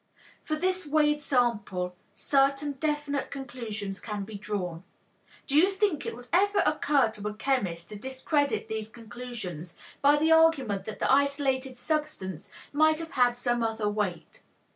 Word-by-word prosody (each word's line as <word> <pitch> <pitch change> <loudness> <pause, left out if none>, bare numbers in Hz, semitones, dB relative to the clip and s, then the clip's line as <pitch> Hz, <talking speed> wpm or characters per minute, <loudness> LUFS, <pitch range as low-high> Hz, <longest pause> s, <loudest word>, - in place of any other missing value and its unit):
From 310 0 -3
this 370 -2 0
weighed 295 0 +3
sample 210 -10 0 0.2
certain 275 +1 +2
definite 290 0 -2
conclusions 225 -7 -5
can 210 -2 -4
be 215 +2 -9
drawn. 195 -4 -4 0.6
Do 275 - -2
you 345 +6 +6
think 390 -5 0
it - - -4
would 245 +1 -12
ever 405 +3 +4
occur 270 -6 +2
to 210 -1 -6
a 210 - -4
chemist 200 -10 -1
to 210 - -7
discredit 265 +5 -1
these 220 -1 -4
conclusions 220 -8 -7 0.3
by 285 +1 +6
the 315 +2 +2
argument 275 -12 +4
that 215 - -6
the - - +1
isolated 270 -2 +1
substance 210 - -3 0.2
might 310 +1 +4
have 325 0 -7
had 245 -4 +3
some 240 -1 0
other 225 -2 -1
weight? 205 -5 -3
255 Hz, 150 wpm, -28 LUFS, 210-295 Hz, 0.6 s, you